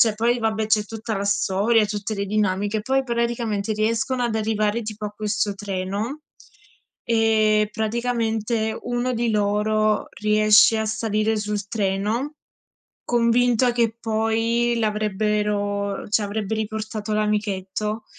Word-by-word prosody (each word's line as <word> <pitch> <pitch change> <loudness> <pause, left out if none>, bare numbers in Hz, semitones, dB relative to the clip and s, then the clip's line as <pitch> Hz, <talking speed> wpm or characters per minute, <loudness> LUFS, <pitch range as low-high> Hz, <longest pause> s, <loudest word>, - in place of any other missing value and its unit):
cioè, 220 -2 +5
poi 235 +3 +1
vabbè, 220 -1 0
c'è 215 -1 +2
tutta 220 0 -5
la 200 - -2
storia, 205 +3 +2
tutte 210 +1 -3
le 200 0 -2
dinamiche. 205 +1 0
Poi 270 +2 +1
praticamente 235 -4 -1
riescono 230 +4 0
ad 235 -2 0
arrivare 215 +1 0
tipo 215 -1 -6
a 210 - -3
questo 210 -1 -2
treno 200 +7 -4 0.8
e 220 -2 +3
praticamente 225 -1 -1
uno 245 +1 -1
di 235 0 0
loro 210 +1 +1
riesce 215 +1 +5
a 220 - 0
salire 220 0 0
sul 210 -1 -3
treno, 215 +8 -1 0.7
convinto 240 +1 +3
che 230 -2 0
poi 225 +1 0
l'avrebbero 210 -1 -1
cioè, 210 -1 +2
avrebbe 210 +1 -3
riportato 215 0 -4
l'amichetto. 210 0 -1
215 Hz, 120 wpm, -23 LUFS, 210-230 Hz, 0.8 s, cioè